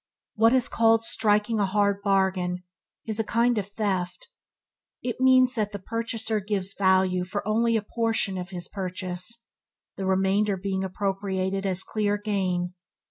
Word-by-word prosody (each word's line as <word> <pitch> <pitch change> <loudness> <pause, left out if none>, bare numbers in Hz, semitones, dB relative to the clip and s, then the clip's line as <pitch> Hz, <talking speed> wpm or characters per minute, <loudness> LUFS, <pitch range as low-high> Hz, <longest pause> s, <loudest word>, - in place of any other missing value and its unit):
What 225 +1 +4
is 255 -1 +4
called 225 0 +3
"striking 215 0 +1
a 200 - +2
hard 200 0 +1
bargain" 190 -2 +1 0.4
is 220 -1 -3
a - - +2
kind 235 +1 +2
of 195 - -4
theft. 205 - -3 0.7
It 245 0 -3
means 255 -1 +5
that 215 -4 -2
the - - -3
purchaser 225 +1 -2
gives 200 -1 -2
value 185 -1 +2
for 205 +3 -4
only 230 +1 +2
a 215 - -3
portion 220 -4 0
of 180 0 -6
his 180 -2 -3
purchase, 185 +3 -4 0.5
the 195 - -3
remainder 195 +2 +2
being 190 0 -2
appropriated 195 0 -2
as 190 0 -1
clear 205 -1 0
gain. 190 -4 -1
200 Hz, 150 wpm, -26 LUFS, 190-225 Hz, 0.7 s, means